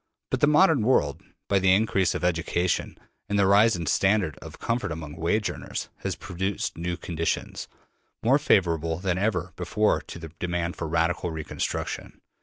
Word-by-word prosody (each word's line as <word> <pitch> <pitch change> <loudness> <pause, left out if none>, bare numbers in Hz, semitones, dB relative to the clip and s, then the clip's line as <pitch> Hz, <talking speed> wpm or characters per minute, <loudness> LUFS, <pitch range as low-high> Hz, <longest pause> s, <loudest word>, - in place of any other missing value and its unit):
But - - +1
the - - +4
modern 150 -2 +5
world, 75 - +2 0.3
by 100 - +3
the 95 0 +4
increase 100 -2 +2
of - - -3
education 85 0 0 0.3
and 105 - +1
the 100 - +4
rise 105 +3 +5
in 85 - -3
the 80 - -2
standard 95 -6 +2
of - - -10
comfort 115 -5 -2
among 75 -2 -6
wage 85 +6 0
earners, - - -5
has - - -3
produced 95 +2 -3
new 85 +1 -3
conditions, 85 -2 -3 0.6
more 130 +5 +4
favorable 85 - +2
than 90 0 -1
ever 95 -4 -1
before 105 +4 +1
to - - -10
the 80 -1 -8
demand 85 -1 -2
for 80 - -4
radical 85 +2 0
reconstruction. 80 -2 -4
90 Hz, 170 wpm, -26 LUFS, 85-105 Hz, 0.6 s, modern